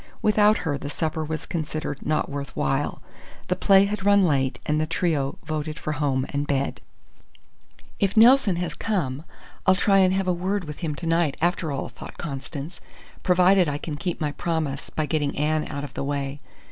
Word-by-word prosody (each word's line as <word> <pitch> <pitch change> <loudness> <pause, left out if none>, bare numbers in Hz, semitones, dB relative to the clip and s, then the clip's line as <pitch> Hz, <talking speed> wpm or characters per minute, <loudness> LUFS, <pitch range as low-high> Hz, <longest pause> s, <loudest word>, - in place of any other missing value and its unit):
Without 210 0 +5
her, 145 -3 -1
the 140 - -5
supper 160 +1 -2
was 155 0 -4
considered 155 -3 -4
not 155 0 0
worth 140 -3 -6
while. 70 - -1 0.5
The 180 - +2
play 195 +1 +5
had 200 -1 -3
run 200 -1 +5
late, 135 -5 +1
and 150 +1 +1
the 155 - 0
trio 155 -5 0
voted 155 0 -3
for 155 - -3
home 135 -3 0
and 145 +1 -2
bed. 140 -1 -1 1.2
"If 200 +1 0
Nelson 230 -4 +6
has 175 +1 -3
come, 155 -10 -2 0.4
I'll 185 - +7
try 195 +1 +4
and 185 -1 +5
have 195 -1 0
a 180 - +3
word 185 +3 -1
with 150 -2 -8
him 155 -4 -2
to 170 - -7
night, 165 -3 +1
after 170 -2 0
all," 140 - -3
thought - - -11
Constance, 140 +1 -6 0.4
"provided 180 -1 +4
I 145 - -2
can 150 0 -5
keep 175 +3 -3
my 150 -2 -1
promise 155 -3 -2
by 155 - -2
getting 150 -2 -1
Anne 155 +1 +1
out 140 -1 -5
of 145 - -7
the - - -3
way. 140 0 -3
155 Hz, 190 wpm, -25 LUFS, 145-180 Hz, 1.2 s, I'll